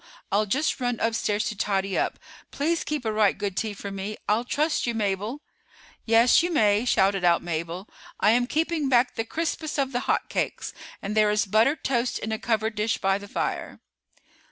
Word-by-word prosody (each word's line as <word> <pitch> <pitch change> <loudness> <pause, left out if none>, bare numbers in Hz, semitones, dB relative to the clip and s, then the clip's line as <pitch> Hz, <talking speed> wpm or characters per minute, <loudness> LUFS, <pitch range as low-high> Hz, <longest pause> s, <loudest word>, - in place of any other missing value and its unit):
I'll 210 +2 +2
just 275 +8 0
run 245 -2 -1
upstairs 220 -2 0
to 215 - -5
tidy 195 -1 -1
up. - - 0 0.3
Please 325 +4 -1
keep 300 -5 -3
a 220 - +1
right 215 -2 +3
good 200 -2 -3
tea 215 0 -2
for 200 0 -6
me; 195 +2 -5
I'll 215 +3 +2
trust 300 +3 0
you, 235 - -1
Mabel." 210 +6 -2 0.6
"Yes, 230 +2 +6
you 350 +1 -1
may," 215 -6 +3
shouted 195 -5 +2
out 170 -1 +3
Mabel. 170 +3 -4 0.3
"I 210 - +5
am 245 +1 +2
keeping 315 0 0
back 245 -1 +3
the 225 - -2
crispest 315 +3 -3
of 270 -1 0
the 245 - 0
hot - - +1
cakes, - - -3 0.3
and 205 +2 -3
there 215 -1 +4
is 210 +1 +2
buttered 225 +9 +2
toast 245 -2 0
in 220 - -4
a 220 - -2
covered 220 -1 0
dish 215 +2 0
by 195 +1 +1
the 205 - -10
fire." - - -3
220 Hz, 195 wpm, -25 LUFS, 205-255 Hz, 0.6 s, Yes